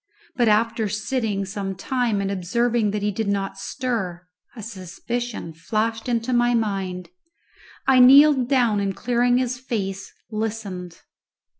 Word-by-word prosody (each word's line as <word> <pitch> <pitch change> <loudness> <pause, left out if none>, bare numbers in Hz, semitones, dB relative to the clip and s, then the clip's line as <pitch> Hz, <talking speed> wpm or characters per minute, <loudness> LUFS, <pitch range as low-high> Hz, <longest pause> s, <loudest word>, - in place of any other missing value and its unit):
But 240 -2 +2
after 220 0 +2
sitting 210 -1 -2
some 195 0 -4
time 235 0 -1
and 195 0 -2
observing 225 +4 0
that 205 0 -3
he 210 - +1
did 215 +2 -3
not 195 -1 -2
stir, 195 -7 -3 0.3
a 220 - -8
suspicion 220 0 -5
flashed 220 +8 -2
into 235 +1 0
my 240 0 +3
mind; 195 -5 -2 0.8
I 265 -1 +5
kneeled 265 0 +7
down, 240 -6 +3
and 195 -1 -1
clearing 245 0 +2
his 250 0 -1
face, 195 -7 -4 0.2
listened. 210 -5 -5
220 Hz, 135 wpm, -23 LUFS, 195-240 Hz, 0.8 s, kneeled